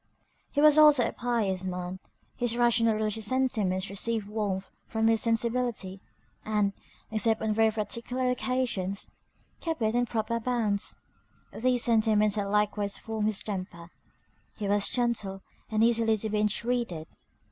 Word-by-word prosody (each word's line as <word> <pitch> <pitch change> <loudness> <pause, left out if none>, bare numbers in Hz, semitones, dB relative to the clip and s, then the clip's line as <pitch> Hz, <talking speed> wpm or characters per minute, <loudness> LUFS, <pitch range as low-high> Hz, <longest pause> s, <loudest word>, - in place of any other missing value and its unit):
He 290 - 0
was 305 0 +6
also 295 -5 +6
a - - -3
pious 215 -6 -1
man; 180 0 -4 0.4
his 240 -1 0
rational 235 -2 +3
religious 215 0 0
sentiments 210 -7 0
received 215 +2 -1
warmth 205 -3 -3 0.2
from 225 0 -1
his 225 -1 +3
sensibility; 230 -4 -1 0.4
and, 210 -2 0 0.4
except 220 0 +2
on 220 -1 0
very 225 +1 +4
particular 235 +4 -2
occasions, 240 -7 -1 0.5
kept 325 -3 -3
it 220 -1 +1
in 245 0 +1
proper 225 +1 -1
bounds; 220 -4 -1 0.6
these 250 0 +1
sentiments 215 -2 +3
had 205 -1 -1
likewise 205 0 0
formed 220 -1 -3
his 215 -3 0
temper; 185 -4 -6 0.6
he 210 - -4
was 205 0 +3
gentle, 225 -6 -1 0.3
and 220 0 +1
easily 225 -1 +3
to 215 +1 -3
be 210 - 0
intreated. 210 -5 -1
220 Hz, 140 wpm, -28 LUFS, 205-235 Hz, 0.6 s, was